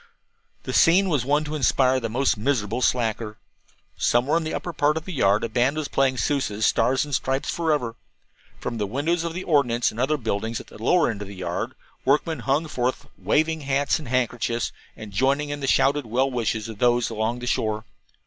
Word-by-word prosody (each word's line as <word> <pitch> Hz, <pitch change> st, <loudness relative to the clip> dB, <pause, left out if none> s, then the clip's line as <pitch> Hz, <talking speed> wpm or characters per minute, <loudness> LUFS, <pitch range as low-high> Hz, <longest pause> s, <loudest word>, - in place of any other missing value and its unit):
The -, -, -5 dB
scene 185 Hz, +4 st, +5 dB
was 145 Hz, -7 st, 0 dB
one 145 Hz, +3 st, +2 dB
to 150 Hz, 0 st, -5 dB
inspire 130 Hz, -2 st, +3 dB
the 115 Hz, -2 st, -3 dB
most 125 Hz, +2 st, +1 dB
miserable 115 Hz, 0 st, -1 dB
slacker. 115 Hz, -3 st, 0 dB, 0.6 s
Somewhere 125 Hz, +7 st, +2 dB
in 170 Hz, -, -1 dB
the 155 Hz, -, -3 dB
upper 175 Hz, -, -4 dB
part 150 Hz, +1 st, +2 dB
of 160 Hz, -, -5 dB
the 185 Hz, -, -6 dB
yard 100 Hz, -7 st, +2 dB
a -, -, 0 dB
band 125 Hz, +6 st, +1 dB
was 155 Hz, -2 st, -2 dB
playing 135 Hz, -1 st, +1 dB
Sousa's 110 Hz, -4 st, 0 dB
"Stars 130 Hz, +5 st, +2 dB
and 145 Hz, -, -8 dB
Stripes 135 Hz, +1 st, 0 dB
Forever." 150 Hz, -8 st, 0 dB, 0.7 s
From 115 Hz, -, -4 dB
the 105 Hz, -, -1 dB
windows 155 Hz, -, 0 dB
of 170 Hz, -1 st, -4 dB
the 185 Hz, -, -4 dB
ordnance 125 Hz, -7 st, +2 dB
and 110 Hz, -, -9 dB
other 145 Hz, +4 st, +1 dB
buildings 110 Hz, -2 st, -2 dB
at -, -, -10 dB
the -, -, -14 dB
lower 165 Hz, +3 st, +3 dB
end 105 Hz, -2 st, -7 dB
of 100 Hz, -, -6 dB
the 100 Hz, -, -9 dB
yard 90 Hz, -2 st, -4 dB, 0.3 s
workmen 150 Hz, +4 st, +1 dB
hung 145 Hz, +4 st, 0 dB
forth, 130 Hz, -3 st, -2 dB
waving 160 Hz, +1 st, +1 dB
hats 140 Hz, +1 st, +1 dB
and 150 Hz, -, -9 dB
handkerchiefs, 120 Hz, -1 st, -1 dB, 0.3 s
and 110 Hz, -2 st, -9 dB
joining 135 Hz, +8 st, +1 dB
in 145 Hz, 0 st, -4 dB
the 135 Hz, -, -3 dB
shouted 140 Hz, 0 st, +2 dB
well 130 Hz, +4 st, +1 dB
wishes 115 Hz, -3 st, -1 dB
of 110 Hz, -2 st, -9 dB
those 120 Hz, -1 st, +2 dB
along 110 Hz, +2 st, -1 dB
the 125 Hz, -, -6 dB
shore. 110 Hz, -3 st, -1 dB
130 Hz, 205 wpm, -24 LUFS, 115-145 Hz, 0.7 s, scene